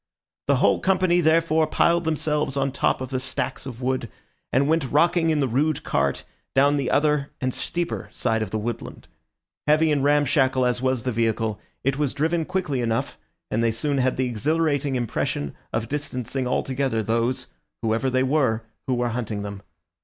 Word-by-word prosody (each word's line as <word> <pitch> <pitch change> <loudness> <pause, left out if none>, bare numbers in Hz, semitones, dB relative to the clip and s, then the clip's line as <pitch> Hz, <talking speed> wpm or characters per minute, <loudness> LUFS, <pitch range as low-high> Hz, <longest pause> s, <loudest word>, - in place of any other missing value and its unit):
The - - +4
whole - - +3
company, 185 -2 +3
therefore, 160 -1 +3
piled 170 +2 +2
themselves 150 -3 0
on 135 0 +1
top 130 - 0
of 130 - -4
the 130 -1 -1
stacks 130 +1 -3
of 125 -1 -7
wood, 130 -2 -1 0.4
and 135 +2 +3
went 155 -4 +1
rocking 165 +3 +3
in 155 -2 +2
the 135 - +2
rude 145 +5 0
cart - - 0 0.3
down 140 +2 +4
the 135 -3 -1
other 150 -1 +2
and 130 -1 -1
steeper 175 0 -3
side 110 0 0
of 110 - -2
the 110 - -2
woodland. 115 +2 -5 0.6
Heavy 155 +1 +4
and 145 -2 +1
ramshackle 135 -3 +3
as 125 0 0
was 130 -3 0
the 130 - -1
vehicle, 110 -2 0 0.2
it 135 +1 0
was 145 -3 0
driven 160 +3 +1
quickly 180 -8 -1
enough, 115 -1 -1 0.4
and 115 +2 +1
they 115 - +3
soon 140 +5 -1
had 130 0 +1
the 130 - +1
exhilarating 145 +3 0
impression 105 - -2 0.2
of 110 0 -2
distancing 130 -2 -3
altogether 130 -2 0
those, 115 +4 0 0.4
whoever 115 +4 +1
they 130 0 +2
were, 130 -5 +1 0.2
who 130 - +1
were 120 0 0
hunting 110 -3 -3
them. 100 -1 -6
135 Hz, 175 wpm, -24 LUFS, 120-150 Hz, 0.6 s, The